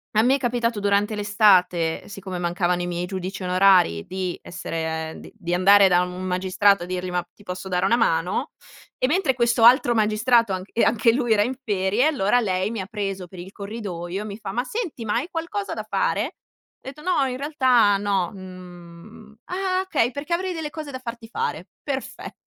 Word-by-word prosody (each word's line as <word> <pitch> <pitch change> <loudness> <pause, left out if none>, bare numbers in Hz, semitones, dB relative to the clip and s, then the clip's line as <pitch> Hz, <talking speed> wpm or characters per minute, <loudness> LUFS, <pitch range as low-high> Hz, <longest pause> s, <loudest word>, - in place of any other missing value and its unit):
A 215 - +5
me 260 +3 +4
è - - 0
capitato 240 -3 -1
durante 205 +1 +1
l'estate, 195 -5 +2
siccome 190 -3 -6
mancavano 175 0 0
i 175 - -3
miei 175 0 -3
giudici 185 +1 -5
onorari, 180 - +3
di 185 -1 -3
essere 160 -1 -4
ehm, - - -10
di - - -12
di 175 -3 -3
andare 195 +2 +6
da 180 -1 +4
un 180 +1 -4
magistrato 185 +2 +2
a - - -4
dirgli: 180 0 -4
"Ma 180 -1 -1
ti 205 - -18
posso 185 0 -6
dare 180 +1 +1
una 230 - +4
mano?" 185 - 0 0.5
E, - - +1
mentre 300 -3 +1
questo 235 -1 +2
altro 240 0 +6
magistrato 220 +1 +2
anc 185 +1 -4
e 235 - +1
anche 230 0 +3
lui 240 -3 +1
era 205 -1 +3
in 250 - -2
ferie, 205 +6 +1
allora 245 -6 +2
lei 190 -2 -1
mi 220 -4 -3
ha 190 - -7
preso 195 -4 -4
per 185 +1 -14
il 180 +2 -9
corridoio, 200 -3 -6
e - - -8
mi 205 -1 -7
fa: 200 -3 -6
"Ma 245 +5 -1
senti, 305 - -5
ma 210 - -1
hai 265 +9 -1
qualcosa 345 +5 -4
da - - -4
fare?" - - 0
Ho - - -6 0.5
detto: 280 +3 -10
"No 360 -6 +2
in 255 0 -4
realtà, 255 -8 +3
no, 195 -3 0
mhmm" 185 +3 -12
"Ah, - - -8
mhmm, 375 -1 0
okay 285 -10 +1
perché 290 +5 -4
avrei 370 +1 -1
delle 315 -3 -5
cose 310 -2 -7
da 260 - -5
farti 235 -2 -8
fare." 455 - -3 0.2
Perfet 270 -2 -5
205 Hz, 205 wpm, -23 LUFS, 185-245 Hz, 0.5 s, andare